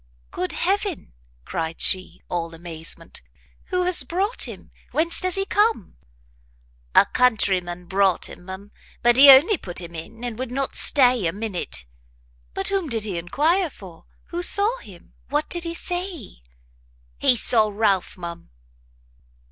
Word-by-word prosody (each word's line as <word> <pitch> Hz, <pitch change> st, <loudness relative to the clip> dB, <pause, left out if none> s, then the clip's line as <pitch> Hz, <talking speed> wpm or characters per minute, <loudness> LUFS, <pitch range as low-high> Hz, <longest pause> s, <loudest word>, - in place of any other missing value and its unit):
"Good 180 Hz, -, -4 dB
heaven," 390 Hz, -, -2 dB, 0.3 s
cried 165 Hz, 0 st, -5 dB
she, 185 Hz, -1 st, -2 dB
all 165 Hz, -1 st, -4 dB
amazement, 165 Hz, -1 st, -7 dB, 0.4 s
"who 365 Hz, -1 st, -1 dB
has 360 Hz, -2 st, +4 dB
brought 375 Hz, -, -1 dB
him? -, -, -11 dB, 0.2 s
whence 330 Hz, +2 st, +1 dB
does 370 Hz, -1 st, 0 dB
he 390 Hz, 0 st, -1 dB
come?" 415 Hz, -, 0 dB, 1.0 s
"A -, -, +7 dB
country 215 Hz, -7 st, +2 dB
man 175 Hz, 0 st, -9 dB
brought 190 Hz, -1 st, +1 dB
him, 175 Hz, -, -13 dB
ma'am; 190 Hz, +2 st, -10 dB, 0.3 s
but 240 Hz, 0 st, +4 dB
he 275 Hz, +2 st, +8 dB
only 295 Hz, +8 st, +7 dB
put 175 Hz, -2 st, -4 dB
him 170 Hz, -1 st, -8 dB
in, 220 Hz, +9 st, -10 dB
and 240 Hz, -2 st, -6 dB
would 260 Hz, -1 st, -4 dB
not 270 Hz, +2 st, -3 dB
stay 250 Hz, -8 st, +5 dB
a -, -, -1 dB
minute." 190 Hz, -, -5 dB, 0.7 s
"But -, -, -2 dB
whom 385 Hz, -6 st, -2 dB
did 225 Hz, -3 st, -2 dB
he 195 Hz, -5 st, -4 dB
enquire 320 Hz, -, 0 dB
for? 185 Hz, -, -14 dB, 0.2 s
who 345 Hz, 0 st, -4 dB
saw 415 Hz, +7 st, +6 dB
him? 185 Hz, -5 st, -16 dB, 0.2 s
what 295 Hz, +2 st, -1 dB
did 345 Hz, -1 st, +2 dB
he 335 Hz, 0 st, -4 dB
say?" 350 Hz, -, -6 dB, 0.8 s
"He 250 Hz, -, +4 dB
saw 220 Hz, -2 st, +3 dB
Ralph, 200 Hz, -3 st, -1 dB
ma'am." 170 Hz, -1 st, -9 dB
230 Hz, 150 wpm, -22 LUFS, -, 1.0 s, he